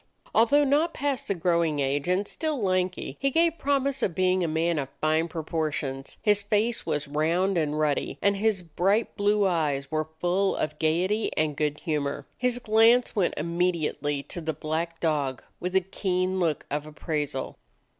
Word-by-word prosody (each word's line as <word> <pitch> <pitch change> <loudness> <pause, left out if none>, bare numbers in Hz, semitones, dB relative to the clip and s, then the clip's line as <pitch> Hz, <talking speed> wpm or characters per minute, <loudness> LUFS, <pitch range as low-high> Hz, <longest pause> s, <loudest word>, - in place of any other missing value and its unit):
Although 260 +6 +5
not 295 +4 +2
past 280 -3 -2
the 200 - 0
growing 170 -3 +1
age 140 +1 0
and 185 +3 +1
still 310 -4 -3
lanky, 185 -2 -1
he 275 - +2
gave 330 +3 +2
promise 275 -1 0
of 170 - 0
being 185 0 +2
a - - +1
man 160 +1 0
of 135 -2 -4
fine 155 +2 +2
proportions; 155 -4 -3
his 205 -2 +3
face 210 +2 0
was 150 -2 -1
round 165 +6 +1
and 155 -3 0
ruddy, 150 -2 0
and 200 0 +2
his 205 -3 +1
bright 190 +7 0
blue 205 0 +2
eyes 150 -7 0
were 155 0 -1
full 190 +2 +1
of 150 0 -3
gaiety 180 +7 +1
and 155 -2 +1
good 150 0 -1
humor. 145 -3 -2
His 250 -1 0
glance 230 +1 +4
went 190 -5 +1
immediately 155 -4 -1
to 175 - -6
the 160 0 -2
black 160 +3 -3
dog 145 -5 0 0.2
with 180 +1 -3
a 190 - +5
keen 185 0 -1
look 165 -5 0
of 150 +1 -2
appraisal. 150 -3 -3
175 Hz, 170 wpm, -26 LUFS, 155-205 Hz, 0.2 s, Although